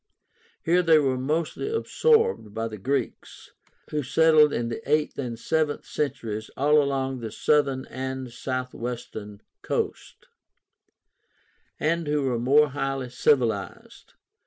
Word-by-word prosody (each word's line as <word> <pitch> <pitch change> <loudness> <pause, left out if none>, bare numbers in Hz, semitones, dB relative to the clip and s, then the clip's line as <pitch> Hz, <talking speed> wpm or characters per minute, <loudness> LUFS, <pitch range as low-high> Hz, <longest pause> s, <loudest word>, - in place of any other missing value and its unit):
Here 175 +2 +3
they 165 -2 +5
were 135 -3 +2
mostly 155 - -2
absorbed 450 - +1
by 115 0 -2
the 110 -2 -8
Greeks, 135 +3 -4 0.4
who 150 - 0
settled 155 +2 +5
in 115 -4 -2
the 115 - -5
eighth 150 -1 +1
and 120 -4 -4
seventh 155 +3 -1
centuries 115 -7 -3
all 150 +2 +4
along 135 -2 -1
the 115 -2 -6
southern 140 -1 +1
and 130 0 -5
southwestern 120 -4 -5 0.2
coast, - - -4 1.5
and 165 +1 0
who 145 -1 +1
were 125 -3 0
more 145 +5 +4
highly 135 -2 -3
civilized. 120 -6 -1
135 Hz, 120 wpm, -25 LUFS, 120-150 Hz, 1.5 s, they